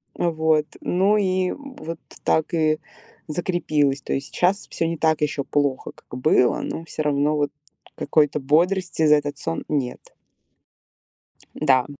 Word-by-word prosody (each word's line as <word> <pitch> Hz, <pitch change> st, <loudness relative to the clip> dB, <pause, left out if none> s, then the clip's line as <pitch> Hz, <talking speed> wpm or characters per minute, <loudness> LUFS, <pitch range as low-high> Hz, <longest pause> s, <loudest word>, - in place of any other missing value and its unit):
Вот, 160 Hz, -2 st, +2 dB, 0.2 s
ну 195 Hz, +4 st, +2 dB
и 185 Hz, -2 st, +1 dB
вот 260 Hz, -, -8 dB, 0.2 s
так 160 Hz, +1 st, +1 dB
и 155 Hz, -1 st, +2 dB, 0.5 s
закрепилось. 155 Hz, -4 st, 0 dB
То -, -, -3 dB
есть 135 Hz, +1 st, -2 dB
сейчас 190 Hz, +4 st, 0 dB
всё 165 Hz, -, -1 dB
не 165 Hz, -1 st, -2 dB
так 160 Hz, -1 st, +2 dB
еще 145 Hz, -2 st, 0 dB
плохо, 140 Hz, -1 st, -1 dB
как 125 Hz, -, -10 dB
было, 125 Hz, -3 st, +3 dB
но 165 Hz, -, -5 dB
всё 155 Hz, 0 st, -4 dB
равно 145 Hz, +1 st, +1 dB
вот 145 Hz, -1 st, 0 dB, 0.4 s
какой-то 150 Hz, 0 st, +2 dB
бодрости 170 Hz, +4 st, +2 dB
за 150 Hz, 0 st, +7 dB
этот 145 Hz, -1 st, -2 dB
сон 165 Hz, 0 st, -3 dB
нет. 135 Hz, -5 st, -3 dB, 1.4 s
Да. 130 Hz, -4 st, +3 dB
155 Hz, 140 wpm, -23 LUFS, 145-170 Hz, 1.4 s, за